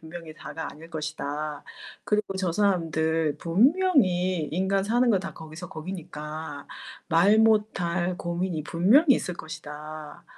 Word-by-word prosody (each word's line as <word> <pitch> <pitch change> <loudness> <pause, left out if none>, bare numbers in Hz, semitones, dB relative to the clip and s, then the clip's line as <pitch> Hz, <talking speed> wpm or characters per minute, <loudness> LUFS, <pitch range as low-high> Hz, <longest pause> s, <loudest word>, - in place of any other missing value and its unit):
분명히 160 0 -9
다가 160 +1 -6
아닐 165 +3 -13
것이다. 150 -1 -4 0.4
그리고 210 -2 0
저 190 -2 0
사람들 160 -5 +1
분명히 185 - +3
인간 190 +3 +1
사는 240 +4 +2
거 195 - +4
다 190 - -6
거기서 160 +2 -9
거기니까 155 -4 -7 0.4
말 195 +6 +5
못 220 -2 +3
할 175 +1 0
고민이 175 -2 -2
분명히 245 - +5
있을 180 - -3
것이다. 155 -1 -8
170 Hz, 270 characters per minute, -26 LUFS, 155-195 Hz, 0.4 s, 말